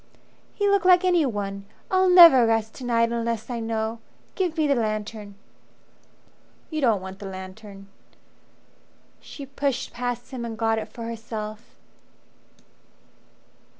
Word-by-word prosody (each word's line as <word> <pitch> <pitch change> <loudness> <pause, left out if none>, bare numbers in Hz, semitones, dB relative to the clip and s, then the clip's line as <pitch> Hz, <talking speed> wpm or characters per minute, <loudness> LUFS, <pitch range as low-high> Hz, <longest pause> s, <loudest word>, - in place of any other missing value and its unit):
"He 410 - 0
looked 400 -2 +3
like 365 0 +6
anyone. 205 - 0 0.3
I'll 375 0 +3
never 335 -10 +8
rest 225 -1 0
to - - -10
night 230 -1 +1
unless 230 0 -3
I 235 - -3
know. 225 0 -3 0.3
Give 360 -4 -2
me 310 - +2
the 285 - +3
lantern." 215 -3 -3 1.4
"You 310 -1 -2
don't 220 -7 +2
want 190 +1 -9
the 200 - -7
lantern." 195 +1 -10 1.3
She 280 - -10
pushed 270 -1 -3
past 245 0 -4
him 255 -3 -5
and 230 -1 -6
got 225 -1 +1
it 215 - -6
for 230 - -8
herself. 225 -1 -7
230 Hz, 130 wpm, -24 LUFS, 215-275 Hz, 1.4 s, never